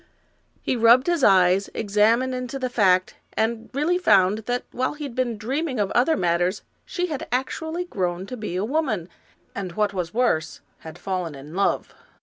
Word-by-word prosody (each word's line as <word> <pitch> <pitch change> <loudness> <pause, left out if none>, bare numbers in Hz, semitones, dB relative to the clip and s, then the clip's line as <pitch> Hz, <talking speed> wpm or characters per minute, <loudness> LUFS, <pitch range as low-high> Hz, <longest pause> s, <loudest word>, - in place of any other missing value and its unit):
He - - 0
rubbed 235 +2 +5
his 345 -5 0
eyes, 190 0 +4
examined 225 +5 +2
into 250 +1 -4
the 255 -2 -3
fact, 185 -5 +2 0.2
and 225 0 -1
really 310 +7 +1
found 200 - +4
that 245 0 -1
while 255 +4 -2
he 300 - -7
had 275 -4 -5
been 240 -3 -1
dreaming 260 +4 -2
of 200 -2 0
other 265 +7 +3
matters, 175 +2 0 0.2
she 360 -1 -2
had 305 -6 -5
actually 320 +7 -2
grown 180 - -2
to 250 - -7
be 210 -6 -5
a 190 +3 0
woman, 225 - -1 0.4
and, 185 -3 -5
what 210 0 0
was 180 -3 -3
worse, 225 -9 0 0.2
had 160 +1 -10
fallen 180 -6 -3
in 140 +3 -11
love. 195 +2 0
220 Hz, 175 wpm, -24 LUFS, 185-260 Hz, 0.4 s, rubbed